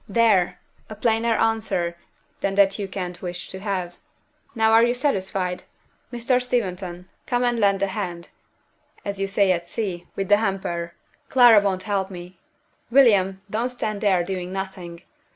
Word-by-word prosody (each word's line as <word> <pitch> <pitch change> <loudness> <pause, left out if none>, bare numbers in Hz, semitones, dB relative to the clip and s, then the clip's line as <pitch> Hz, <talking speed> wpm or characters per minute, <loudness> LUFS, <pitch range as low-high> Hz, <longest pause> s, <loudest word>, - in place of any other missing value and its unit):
"There! 195 -5 +3 0.3
a 215 - -7
plainer 225 +1 +1
answer 205 -6 0 0.4
than 195 0 -1
that 200 0 +3
you 200 - -3
can't 180 -2 -6
wish 180 -1 -6
to 190 - -6
have. 185 -3 -4 0.6
Now 220 -1 +3
are 225 0 +7
you 240 +1 +2
satisfied? 190 -8 -1 0.5
Mr. 245 +1 +1
Steventon, 185 -7 -3 0.2
come 245 0 +1
and 240 -1 +1
lend 200 -2 +2
a - - +5
hand 180 -3 -5 0.8
(as 200 -1 -4
you 195 - 0
say 195 -1 +3
at 175 -1 -2
sea) 180 -6 -4
with 195 -1 -2
the 205 - +6
hamper 175 -5 -3 0.3
Clara 240 -5 +7
won't 190 -2 -1
help 195 -2 -1
me. 180 -1 -10 0.5
William, 200 -7 +4
don't 225 +4 -1
stand 215 -4 -4
there 190 -5 +3
doing 180 0 -4
nothing. 190 -3 -6
195 Hz, 155 wpm, -23 LUFS, 180-225 Hz, 0.8 s, are